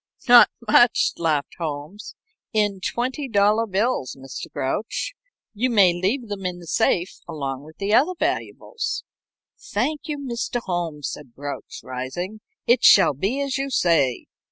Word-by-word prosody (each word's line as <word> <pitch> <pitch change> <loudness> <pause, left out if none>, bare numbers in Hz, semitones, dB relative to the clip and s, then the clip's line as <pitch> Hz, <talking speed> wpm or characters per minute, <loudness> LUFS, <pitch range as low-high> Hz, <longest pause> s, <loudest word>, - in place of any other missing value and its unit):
"Not 240 -1 +9 0.2
much," 240 +2 +5
laughed 155 -4 0
Holmes. 160 +7 -6 0.4
"In 205 -3 +1
twenty 255 +7 -3
dollar 210 +1 +3
bills, 200 - -1
Mr. 135 0 -8
Grouch. 135 +12 -3 0.4
You 240 +4 0
may 200 -7 +5
leave 205 +8 -1
them 205 -2 -5
in 180 -1 -3
the 175 - -12
safe 175 +2 0
along 140 -4 -5
with 160 +1 -15
the 200 +1 -1
other 300 +11 +4
valuables." 460 - -2 0.6
"Thank 300 - -2
you, 300 -1 -3
Mr. 245 -3 -3
Holmes," 165 -7 -3
said 130 -6 -10
Grouch, 145 0 -7
rising. 155 +12 -5 0.2
"It 240 +1 +3
shall 190 -6 +7
be 200 - -1
as 275 -1 -1
you 275 0 -2
say. 165 - +2
200 Hz, 145 wpm, -23 LUFS, 155-240 Hz, 0.6 s, Not